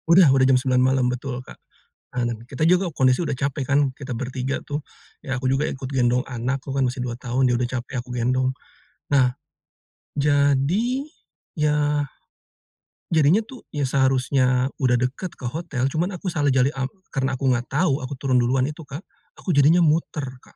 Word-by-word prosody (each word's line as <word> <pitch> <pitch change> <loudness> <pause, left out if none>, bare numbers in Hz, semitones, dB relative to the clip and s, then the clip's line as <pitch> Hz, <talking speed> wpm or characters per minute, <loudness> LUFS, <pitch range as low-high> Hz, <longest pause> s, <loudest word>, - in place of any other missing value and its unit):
Udah 170 0 +7
udah 135 -1 +4
jam 130 - +6
9 125 0 +2
malam, 130 0 +3
betul, 125 0 -4
Kak. - - -12 0.6
Nah, 125 - +1 0.2
kita 140 +3 -1
juga 180 +1 +3
kondisi 130 +2 +2
udah 145 -4 -2
capek 140 +1 -2
kan, 145 0 +4 0.2
kita 140 -1 -8
bertiga 130 +2 -3
tuh. 145 +1 -3 0.4
Ya, 135 -3 -3
aku 130 0 -2
juga 135 +3 +1
ikut 130 -1 -5
gendong 125 -2 +1
anak, 130 +2 -2
anakku 135 - -6
kan 135 - +2
masih 125 +1 -4
2 120 -1 -3
tahun, 125 +1 +1
dia 125 - +2
udah 125 0 0
capek 120 - -9
aku 125 - -17
gendong. 130 +2 +1 0.6
Nah, 130 -3 +4 0.9
jadi 145 - +2 0.7
ya 150 -1 +1 1.1
jadinya 160 +5 +4
tuh, 255 +2 -13
ya, 145 -1 -1
seharusnya 130 -1 +2
udah 125 -2 +3
dekat 130 +8 -3
ke 130 - -9
hotel, 145 -3 -3
cuma 165 +4 0
aku 185 +1 -4
salah 145 -3 +1
cari 130 +1 +3
ap 130 0 -3 0.2
karena 135 -1 0
aku 135 - -3
nggak 120 0 -1
tahu, 145 -1 +1
aku 130 - -5
turun 130 -2 +2
duluan 130 +2 +2
itu, 150 +2 -8
Kak, 140 +4 -7 0.4
aku 185 - -3
jadinya 150 +5 +5
muter, 155 -2 +1 0.2
Kak. - - -22
135 Hz, 180 wpm, -23 LUFS, 130-150 Hz, 1.1 s, Udah